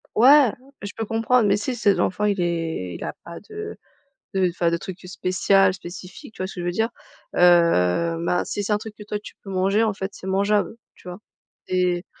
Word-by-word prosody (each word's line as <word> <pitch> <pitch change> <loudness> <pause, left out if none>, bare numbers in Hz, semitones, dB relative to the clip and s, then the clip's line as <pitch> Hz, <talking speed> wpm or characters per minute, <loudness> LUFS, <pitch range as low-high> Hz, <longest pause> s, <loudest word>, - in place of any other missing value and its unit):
Ouais, 265 0 +7 0.3
je 200 - -5
peux 225 - -3
comprendre, 225 +2 +2
mais 200 0 +3
si 245 +5 -3
ses 205 -4 +2
enfant 190 +3 0
il 205 -2 +1
est 165 - -2
il - - -7
a - - -3
pas 170 0 -9
de 425 0 -7 0.6
de 190 -1 +3
enfin, 170 0 0
de 170 - 0
trucs, 185 +2 -9
heu, - - -10
spécial, 185 +1 +2
spécifique, 185 +3 -10
tu - - -4
vois - - 0
ce 190 - -7
que 180 - -6
je - - -4
veux 175 - 0
dire, 220 +5 0 0.5
heu, 170 - +4
ben, 175 +1 0
si 205 - -3
c'est 200 - -3
un 210 - +3
truc 215 0 -9
que - - -14
toi 210 0 -3
tu 210 - -11
peux 195 - -9
manger, 195 +3 +2
en 220 -2 +2
fait, 190 0 -4
c'est 190 - -9
mangeable, 200 +3 +1 0.2
tu - - -17
vois 180 - -7 0.5
et, 180 -1 0
190 Hz, 225 wpm, -23 LUFS, 175-210 Hz, 0.6 s, Ouais